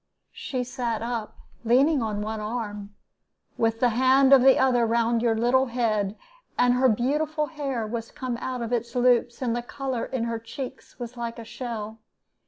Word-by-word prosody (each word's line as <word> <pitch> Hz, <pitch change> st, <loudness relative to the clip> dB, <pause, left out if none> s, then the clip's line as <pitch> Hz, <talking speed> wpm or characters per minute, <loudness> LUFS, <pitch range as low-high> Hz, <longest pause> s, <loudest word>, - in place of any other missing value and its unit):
She 255 Hz, -2 st, -3 dB
sat 240 Hz, -3 st, -3 dB
up, 230 Hz, -2 st, -4 dB, 0.3 s
leaning 265 Hz, +5 st, +4 dB
on 210 Hz, -2 st, -2 dB
one 220 Hz, +1 st, -4 dB
arm, 210 Hz, -2 st, -5 dB, 0.6 s
with 225 Hz, 0 st, 0 dB
the 245 Hz, -, +4 dB
hand 260 Hz, +3 st, +4 dB
of 270 Hz, -, +8 dB
the 265 Hz, +1 st, +6 dB
other 255 Hz, -2 st, +3 dB
round 230 Hz, 0 st, +1 dB
your 230 Hz, -1 st, +2 dB
little 250 Hz, +4 st, +3 dB
head, 220 Hz, -4 st, -1 dB, 0.4 s
and 245 Hz, 0 st, +4 dB
her 255 Hz, +1 st, +4 dB
beautiful 300 Hz, +7 st, 0 dB
hair 275 Hz, -7 st, -3 dB
was 225 Hz, +1 st, -5 dB
come 255 Hz, -2 st, -4 dB
out 250 Hz, 0 st, -4 dB
of 235 Hz, +1 st, -3 dB
its 235 Hz, +1 st, -2 dB
loops, 245 Hz, 0 st, +2 dB
and 235 Hz, -2 st, 0 dB
the 240 Hz, -, -1 dB
color 260 Hz, 0 st, -4 dB
in 260 Hz, -3 st, -3 dB
her 230 Hz, -1 st, -2 dB
cheeks 255 Hz, +3 st, -8 dB
was 245 Hz, 0 st, -7 dB
like 235 Hz, 0 st, -4 dB
a 230 Hz, -, -8 dB
shell. 225 Hz, -1 st, -6 dB
240 Hz, 180 wpm, -25 LUFS, 225-255 Hz, 0.6 s, of